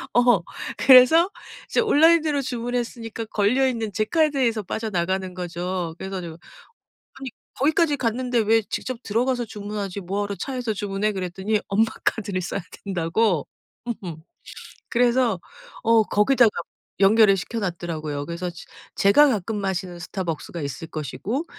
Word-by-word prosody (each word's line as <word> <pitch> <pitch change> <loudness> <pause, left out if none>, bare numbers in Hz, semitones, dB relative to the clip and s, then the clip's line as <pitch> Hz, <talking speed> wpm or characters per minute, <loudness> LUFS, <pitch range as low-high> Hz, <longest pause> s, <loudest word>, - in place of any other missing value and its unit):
어. 240 -7 +4 0.3
그래서 270 +7 +7 0.4
이제 - - +1
온라인으로 320 -7 +4
주문했으니까 240 -2 -4
걸려 220 +6 +2
있는 225 -4 -2
제 215 +2 0
카드에서 275 -7 +1
빠져나가는 190 -2 -2
거죠. 175 -1 -4
그래 190 - -6
가지고 175 -4 -6 0.8
아니 270 -2 -7 0.3
"거기까지 300 +2 +2
갔는데 245 0 -1
왜 225 +1 +3
직접 255 -2 -4
들어가서 245 +3 0
주문하지 205 -2 -5
뭐하러 200 +2 -3
차에서 250 -1 -3
주문해?" 205 +1 -1
그랬더니 190 +3 -2
엄마 210 +3 +3 0.2
카드를 200 -4 -1
써야 180 - -3 0.2
된다고 180 -2 0 0.6
음 170 -4 -6 0.7
그래서 240 -3 +2 0.4
어 230 -1 +5
거기다가 225 +3 +4 0.5
연결을 205 +1 +6
시켜 225 +7 -4
놨더라고요. 160 -6 -4
그래서 170 +1 -4
제 170 - -11 0.3
제가 245 +10 +5
가끔 220 -3 -1
마시는 190 -2 -3
스타벅스가 170 -2 -5
있을 145 +2 -5
것이고 190 - -4
210 Hz, 335 characters per minute, -23 LUFS, 185-245 Hz, 0.8 s, 그래서